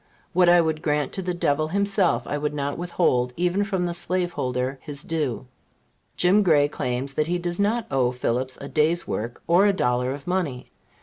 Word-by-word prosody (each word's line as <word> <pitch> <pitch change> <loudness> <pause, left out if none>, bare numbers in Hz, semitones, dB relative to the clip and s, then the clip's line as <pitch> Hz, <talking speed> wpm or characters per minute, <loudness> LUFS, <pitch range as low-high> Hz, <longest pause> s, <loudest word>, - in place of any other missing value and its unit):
What 180 0 +5
I 175 0 +7
would 160 -1 -1
grant 150 -2 0
to 190 - -2
the 180 -1 -3
devil 155 -2 +1
himself, 200 +1 +1
I - - -3
would 150 0 -2
not 140 0 -2
withhold 130 -8 0
even 180 +3 +1
from 190 -4 -1
the 175 - -2
slaveholder 135 -8 -2
his 145 -2 -6
due. 145 -7 -2 0.7
Jim 185 +4 +4
Gray 155 -7 +4
claims 130 -1 -3
that 150 +2 0
he 175 +1 0
does 175 +1 -4
not 220 +3 +1
owe 130 -2 +2
Phillips 125 +1 -2
a 140 - -7
day's 160 +4 +1
work 115 +3 -4
or 180 +4 +4
a 200 - +3
dollar 125 -7 0
of 140 0 -7
money. 175 -9 -2
155 Hz, 190 wpm, -24 LUFS, 135-180 Hz, 0.7 s, I